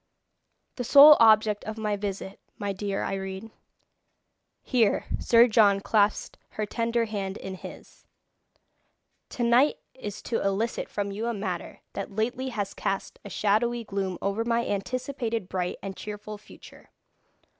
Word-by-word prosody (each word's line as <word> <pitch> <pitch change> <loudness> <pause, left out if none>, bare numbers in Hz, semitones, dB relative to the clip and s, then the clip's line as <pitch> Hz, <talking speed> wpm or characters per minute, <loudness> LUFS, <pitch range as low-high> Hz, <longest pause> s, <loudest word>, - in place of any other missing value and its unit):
"The 250 - -2
sole 285 +5 +9
object 215 -2 +5
of 215 +1 -5
my 210 -1 -1
visit, 195 -1 -5 0.2
my 200 -1 -3
dear 195 0 -3
Irene" 195 +2 -5 1.1
here 235 -5 +2
Sir 235 +1 +5
John 210 -4 +4
clasped 205 +1 0 0.2
her 215 - 0
tender 230 +2 -1
hand 200 -3 -4
in 190 - -7
his 185 - -12 1.2
"tonight 245 +3 +3 0.2
is 210 -5 -8
to 230 - -2
elicit 200 +4 -1
from 200 -1 -3
you 215 +4 -3
a 235 - -1
matter 190 -4 -5
that 195 0 -6
lately 245 +4 -1
has 205 -5 -4
cast 195 0 -3
a 205 - -9
shadowy 220 +6 +1
gloom 195 -3 -3
over 200 +3 0
my 235 0 0
anticipated 230 0 -3
bright 180 -2 -3
and 195 -1 -5
cheerful 210 +1 -7
future. - - -16
210 Hz, 135 wpm, -27 LUFS, 195-230 Hz, 1.2 s, sole